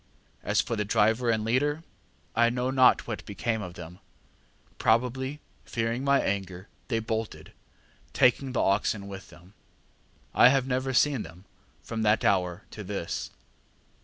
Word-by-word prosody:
As - - +1
for 115 - -3
the 105 - -1
driver 110 +3 +2
and 110 -1 +1
leader, 145 +7 0 0.5
I 120 0 +4
know 125 +2 -1
not 130 -1 +4
what 110 -3 -5
became 110 +2 -2
of 90 -3 -7
them: 90 +2 -10 0.8
probably 130 +5 0 0.2
fearing 115 +2 -2
my 140 0 +4
anger, 95 -1 -3 0.2
they 115 - 0
bolted, 110 0 -4 0.6
taking 130 +1 +2
the - - +1
oxen 100 0 0
with 95 -1 -9
them. 90 +3 -17 0.8
I 120 - +7
have 135 -1 +2
never 130 0 -1
seen 135 -1 +2
them 85 +4 -11 0.4
from 115 -1 -4
that 105 0 +2
hour 90 -1 +1
to 105 - -8
this. 95 -3 -4
115 Hz, 145 wpm, -27 LUFS, 100-125 Hz, 0.8 s, I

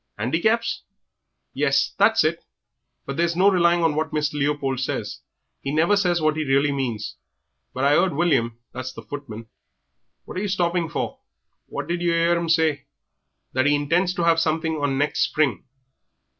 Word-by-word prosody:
"Handicaps?" 195 - 0 0.7
"Yes, - - +1
that's - - +5
it. - - -1 0.6
But 140 - -5
there's 170 0 +1
no 195 +3 +5
relying 170 -2 +3
on 165 -2 +3
what 155 +1 -1
Mr. 150 -1 -1
Leopold 140 -2 -1
says 130 - -3 0.4
he 140 - -4
never 165 +7 +3
says 180 -4 +1
what 155 -1 +1
he 155 - 0
really 140 +1 +2
means. 120 -6 -3 0.5
But 130 - -4
I 140 +1 +4
'eard 175 -2 +2
William, 135 -9 +1
that's 130 +1 -6
the 115 - -11
footman 115 -3 -8 0.4
" 65 -1 -52
"What - - -8
are - - -1
you 210 - -1
stopping 175 -3 0
for? - - -4 0.5
What - - -5
did 175 0 -2
yer 170 -1 +1
'ear 170 +1 +3
'im 170 -1 -2
say?" 160 -4 +1 0.7
"That 130 +2 +2
he 145 - +4
intends 175 +6 +1
to 175 - -1
have 165 -1 +4
something 160 0 0
on 145 -2 -1
next 145 +2 0
spring." 150 -4 0
155 Hz, 175 wpm, -23 LUFS, 140-170 Hz, 0.7 s, that's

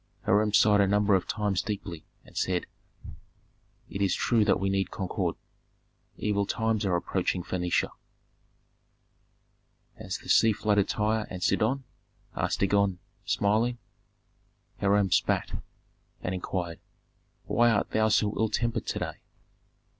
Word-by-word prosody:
Hiram 105 +2 +3
sighed 105 -1 +5
a 100 - +3
number 105 +1 +3
of 95 -2 +2
times 105 -4 0
deeply, 95 -6 -6 0.2
and - - -18
said, 90 -2 0 1.2
"It 100 - -5
is 100 - +2
true 115 -3 +2
that 100 - +3
we 100 - 0
need 95 -1 0
concord. 95 -2 -2 0.8
Evil 100 -1 0
times 110 -1 0
are 90 - +2
approaching 85 +1 -1
Phœnicia." 90 -1 -1 2.1
"Has - - -4
the - - -15
sea 110 -1 +5
flooded 105 -1 +1
Tyre 110 +1 0
and 90 -1 -6
Sidon?" 130 +8 +1 0.5
asked - - -1
Dagon, 100 -1 +2 0.3
smiling. 110 +4 +1 1.0
Hiram 100 -1 +2
spat, - - +1 0.6
and 90 - -2
inquired, 90 -2 -3 0.7
"Why 120 0 +3
art 110 -3 +1
thou 110 0 +3
so 105 -1 +2
ill 110 -1 +2
tempered 115 +1 -1
to - - -2
day?" - - -4
100 Hz, 130 wpm, -28 LUFS, 95-110 Hz, 2.1 s, sighed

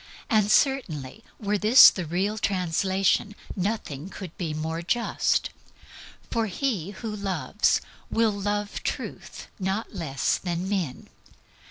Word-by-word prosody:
And, 215 -2 +3
certainly, 215 - +1 0.2
were 205 -1 0
this 220 +6 +9
the 180 -4 -5
real 195 +6 -1
translation, 190 +2 +1 0.2
nothing 185 -6 -3
could 185 -4 -9
be 170 -4 -3
more 160 +2 -3
just; 235 +7 0 0.8
for 230 -1 +1
he 200 - -2
who 210 +1 -6
loves 195 -3 +1 0.3
will 225 -1 +2
love 205 0 -2
Truth - - -5
not 195 +5 -2
less 160 -8 -1
than 175 0 -3
men. 185 -10 -2
195 Hz, 120 wpm, -26 LUFS, 170-210 Hz, 0.8 s, this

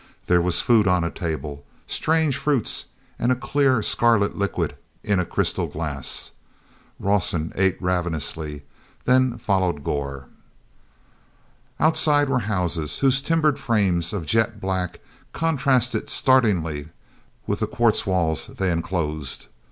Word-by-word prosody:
There 90 0 +3
was 85 -3 +1
food 110 -4 +4
on 90 -2 +3
a 85 - -2
table, 75 -5 -5 0.2
strange 160 -3 +1
fruits, 140 -5 +1 0.3
and 120 - +2
a - - +3
clear 130 -2 +1
scarlet 115 -4 +3
liquid 90 -7 -2 0.3
in 100 -2 +1
a 90 - 0
crystal - - 0
glass. 75 -4 -3 0.7
Rawson 90 -5 0
ate 95 -1 +1
ravenously, 80 -4 -2 0.4
then 125 -1 +3
followed 95 -9 0
Gor. 70 -1 -3 1.5
Outside 155 -2 +3
were 125 - +2
houses, 85 -6 -1
whose 135 0 +2
timbered 155 -1 +1
frames 95 - +1
of 95 -6 -4
jet 110 +5 +1
black 95 -2 -3 0.3
contrasted 130 -7 +1
startlingly 90 - +2 0.6
with - - -2
the - - 0
quartz 115 -2 +2
walls 85 -5 0
they 95 -2 -2
enclosed. 80 -4 -3
95 Hz, 120 wpm, -23 LUFS, 85-125 Hz, 1.5 s, food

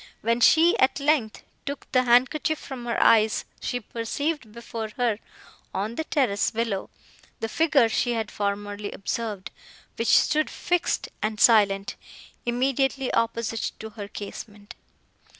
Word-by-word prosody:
When 230 +2 +1
she, 335 - +6
at 265 +2 +3
length, 280 -6 +1 0.2
took 280 0 -5
the 255 -1 +3
handkerchief 265 +6 +3
from 250 -4 -8
her 235 - 0
eyes, 220 -1 +4
she 245 - -2
perceived, 235 +4 -3
before 225 -1 -6
her, 235 -4 +1 0.6
on 205 +4 -2
the 315 +6 -3
terrace 245 -11 +1
below, 225 -4 -2 0.5
the 225 - -2
figure 290 -1 +3
she 240 +2 0
had 220 -2 -3
formerly 205 0 -3
observed, 205 -1 -4 0.5
which 230 -1 +4
stood 310 0 +2
fixed 350 -1 -1
and 215 0 -2
silent, 200 -4 +4 0.5
immediately 265 +2 0
opposite 230 -1 -1
to 220 0 -8
her 205 -2 -7
casement. 205 0 -9
230 Hz, 130 wpm, -25 LUFS, 215-265 Hz, 0.6 s, she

